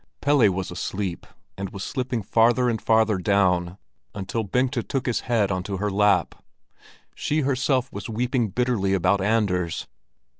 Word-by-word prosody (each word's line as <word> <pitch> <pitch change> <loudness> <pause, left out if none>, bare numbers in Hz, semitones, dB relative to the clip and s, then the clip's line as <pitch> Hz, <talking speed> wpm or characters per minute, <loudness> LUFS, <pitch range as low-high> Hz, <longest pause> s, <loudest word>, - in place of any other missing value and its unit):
Pelle 140 -7 +4
was 95 0 -3
asleep, 95 -3 -4 0.3
and 100 -1 -3
was 95 0 -7
slipping 125 -4 -3
farther 120 +4 +3
and 110 - -3
farther 110 -3 +3
down 90 -2 +1 0.4
until 100 +3 -3
Bengta 125 +5 0
took 135 +2 -3
his 120 - 0
head 110 -5 0
onto 95 +1 -3
her 105 +2 -1
lap. 105 +1 +2 0.8
She 155 +1 -1
herself 130 -1 0
was - - -6
weeping 120 +1 0
bitterly 105 -3 0
about 95 +1 +2
Anders. 95 -5 0
110 Hz, 145 wpm, -24 LUFS, 95-125 Hz, 0.8 s, Pelle